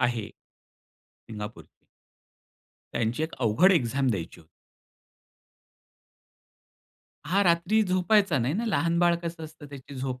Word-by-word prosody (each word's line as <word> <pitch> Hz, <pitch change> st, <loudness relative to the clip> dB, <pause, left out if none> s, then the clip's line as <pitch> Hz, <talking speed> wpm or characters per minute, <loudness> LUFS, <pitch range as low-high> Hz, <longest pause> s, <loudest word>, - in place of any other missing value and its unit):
आहे. 120 Hz, -4 st, 0 dB
सिंगापूर 105 Hz, -2 st, -13 dB, 1.3 s
त्यांची 115 Hz, +6 st, -1 dB
एक 160 Hz, -, -3 dB
अवघड 130 Hz, -, +4 dB
एक्झाम 135 Hz, -4 st, +1 dB
द्यायची 85 Hz, -5 st, -5 dB
होती. 80 Hz, -, -23 dB, 2.8 s
हा 195 Hz, +4 st, +2 dB
रात्री 175 Hz, +5 st, +3 dB
झोपायचा 185 Hz, -2 st, +2 dB
नाही 130 Hz, +6 st, 0 dB
ना 225 Hz, -, -1 dB
लहान 170 Hz, -5 st, +1 dB
बाळ 175 Hz, -1 st, +4 dB
कसं 165 Hz, -1 st, -5 dB
असतं 155 Hz, -1 st, -12 dB
त्याची 140 Hz, 0 st, -11 dB
झोप 130 Hz, -1 st, -4 dB
155 Hz, 110 wpm, -27 LUFS, 120-175 Hz, 2.8 s, अवघड